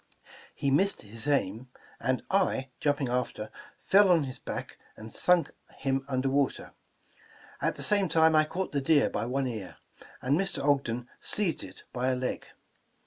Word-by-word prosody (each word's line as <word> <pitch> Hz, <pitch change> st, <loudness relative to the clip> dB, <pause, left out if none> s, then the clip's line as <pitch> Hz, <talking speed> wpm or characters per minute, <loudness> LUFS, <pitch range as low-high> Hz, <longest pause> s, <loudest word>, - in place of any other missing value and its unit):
He 140 Hz, -, 0 dB
missed 195 Hz, +8 st, +2 dB
his 110 Hz, +5 st, -7 dB
aim, 120 Hz, -3 st, 0 dB, 0.3 s
and 130 Hz, 0 st, 0 dB
I, 185 Hz, -9 st, +1 dB
jumping 145 Hz, -2 st, +1 dB
after, 120 Hz, -3 st, -2 dB, 0.3 s
fell 200 Hz, 0 st, +5 dB
on 170 Hz, -4 st, +5 dB
his 130 Hz, -2 st, -6 dB
back -, -, -6 dB, 0.2 s
and 110 Hz, 0 st, -10 dB
sunk 180 Hz, -4 st, +3 dB, 0.3 s
him 135 Hz, 0 st, -1 dB
under 130 Hz, -1 st, 0 dB
water. 140 Hz, 0 st, 0 dB, 0.9 s
At -, -, 0 dB
the -, -, -3 dB
same 200 Hz, -3 st, +3 dB
time 160 Hz, 0 st, +4 dB
I 155 Hz, 0 st, +5 dB
caught 185 Hz, +4 st, -3 dB
the 140 Hz, -, 0 dB
deer 145 Hz, +1 st, +3 dB
by 115 Hz, -, -2 dB
one 135 Hz, +2 st, 0 dB
ear, 110 Hz, -7 st, -5 dB, 0.4 s
and 135 Hz, +3 st, +1 dB
Mr. 195 Hz, -6 st, -1 dB
Ogden 125 Hz, -4 st, +1 dB
seized 200 Hz, -6 st, 0 dB
it 95 Hz, -, -11 dB
by 125 Hz, +1 st, -1 dB
a 130 Hz, -, +2 dB
leg. 125 Hz, 0 st, -3 dB
135 Hz, 165 wpm, -29 LUFS, 125-160 Hz, 0.9 s, fell